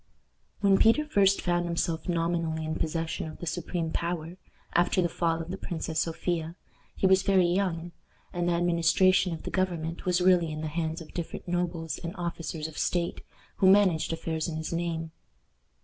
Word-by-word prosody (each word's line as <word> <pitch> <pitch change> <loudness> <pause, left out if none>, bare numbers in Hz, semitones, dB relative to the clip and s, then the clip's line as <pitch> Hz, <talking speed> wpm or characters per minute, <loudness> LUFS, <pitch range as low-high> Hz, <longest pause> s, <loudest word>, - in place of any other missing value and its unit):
When 195 -1 +4
Peter 265 +7 +5
first 200 -8 +3
found 175 -1 +1
himself 170 0 -2
nominally 165 -2 0
in 155 - -2
possession 160 0 -2
of - - -10
the - - -7
supreme 170 0 -2
power, 170 +1 -3 0.4
after 175 +2 +3
the 175 - +3
fall 165 -1 0
of 165 +2 -5
the 190 - -5
Princess 160 -2 -3
Sophia, 165 0 -2 0.4
he - - 0
was 190 0 +5
very 190 -2 +4
young, 175 -2 0 0.4
and 175 0 0
the - - +2
administration 175 +2 +3
of 165 - -5
the - - -5
government 170 -3 -2
was 180 0 +3
really 180 -3 +4
in 155 0 -5
the 155 - -3
hands 160 +1 -2
of 160 - -12
different 170 +1 -5
nobles 175 -2 -2
and 170 0 -6
officers 165 -2 -4
of 160 - -8
state, 175 -1 -1 0.4
who 190 - +5
managed 190 -6 +4
affairs 160 -1 -2
in 160 -2 -4
his 160 +1 -4
name. 165 -1 -2
170 Hz, 180 wpm, -28 LUFS, 165-180 Hz, 0.4 s, Peter